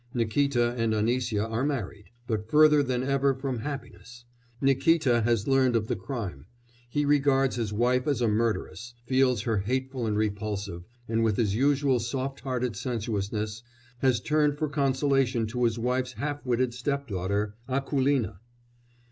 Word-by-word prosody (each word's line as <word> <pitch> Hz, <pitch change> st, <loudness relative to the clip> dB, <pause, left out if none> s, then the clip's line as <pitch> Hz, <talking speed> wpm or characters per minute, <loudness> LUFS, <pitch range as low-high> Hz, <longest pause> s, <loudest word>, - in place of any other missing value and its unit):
Nikíta 120 Hz, +1 st, +1 dB
and 115 Hz, -1 st, +1 dB
Anisya 115 Hz, -1 st, 0 dB
are 115 Hz, +3 st, -2 dB
married, 110 Hz, -8 st, -3 dB, 0.2 s
but 110 Hz, -1 st, -3 dB
further 150 Hz, 0 st, +6 dB
than 130 Hz, -2 st, -1 dB
ever 140 Hz, 0 st, +2 dB
from 130 Hz, -2 st, -3 dB
happiness! 125 Hz, -3 st, -8 dB, 0.3 s
Nikíta 135 Hz, -2 st, +3 dB
has 115 Hz, -3 st, +1 dB
learnt 130 Hz, -2 st, +3 dB
of 110 Hz, -1 st, 0 dB
the -, -, -1 dB
crime; 95 Hz, -, -6 dB, 0.4 s
he 145 Hz, +4 st, 0 dB
regards 135 Hz, -2 st, +3 dB
his 115 Hz, -4 st, -2 dB
wife 125 Hz, +5 st, +1 dB
as 140 Hz, -5 st, +1 dB
a 120 Hz, -, +2 dB
murderess, 115 Hz, +2 st, -1 dB
feels 130 Hz, -3 st, +2 dB
her 115 Hz, -4 st, 0 dB
hateful 130 Hz, +3 st, -2 dB
and 105 Hz, -1 st, 0 dB
repulsive, 100 Hz, -4 st, -3 dB, 0.2 s
and, 115 Hz, 0 st, +1 dB
with 110 Hz, -3 st, +1 dB
his 105 Hz, -4 st, +1 dB
usual 135 Hz, +1 st, +2 dB
soft 130 Hz, +4 st, -3 dB
hearted 125 Hz, -3 st, -2 dB
sensuousness, 105 Hz, -1 st, -3 dB, 0.4 s
has 130 Hz, -3 st, +2 dB
turned 150 Hz, +3 st, +1 dB
for 155 Hz, -, -1 dB
consolation 135 Hz, -3 st, +1 dB
to 120 Hz, +3 st, -1 dB
his 115 Hz, -1 st, +1 dB
wife's 125 Hz, +2 st, -1 dB
half 145 Hz, +5 st, -4 dB
witted 125 Hz, 0 st, +1 dB
stepdaughter 105 Hz, -7 st, -2 dB, 0.2 s
Akoulina. 135 Hz, -6 st, 0 dB
125 Hz, 150 wpm, -27 LUFS, 110-135 Hz, 0.4 s, further